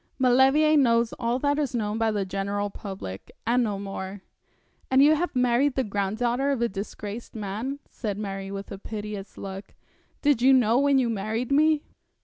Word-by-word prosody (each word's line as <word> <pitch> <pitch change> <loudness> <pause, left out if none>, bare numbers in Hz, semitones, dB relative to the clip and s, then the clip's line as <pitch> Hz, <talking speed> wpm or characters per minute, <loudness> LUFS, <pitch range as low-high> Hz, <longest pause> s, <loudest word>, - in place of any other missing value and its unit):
'Maulevrier 265 +4 +4
knows 235 -5 +3
all 235 0 0
that 285 +2 +1
is 280 -4 -1
known 215 -1 -1
by 225 -1 +2
the 205 -2 -1
general 200 +1 -2
public, 190 - -8
and 245 +1 +3
no 210 -3 -1
more.' 195 0 -6 0.7
'And 265 +1 +5
you 300 +2 +6
have 330 0 -1
married 250 +2 +2
the 265 - +1
granddaughter 230 +6 -1
of 275 -3 0
a 235 - +2
disgraced 205 +3 -7
man,' 220 +6 -4
said 210 -5 -4
Mary, 195 -2 -5
with 195 0 -7
a 195 - -6
piteous 210 -1 -7
look. 195 0 -8 0.5
'Did 285 -5 +3
you 265 +2 +6
know 240 -1 +4
when 280 -1 +4
you 255 -2 +2
married 225 +3 -2
me?' 305 +1 +4
230 Hz, 175 wpm, -26 LUFS, 200-265 Hz, 0.7 s, you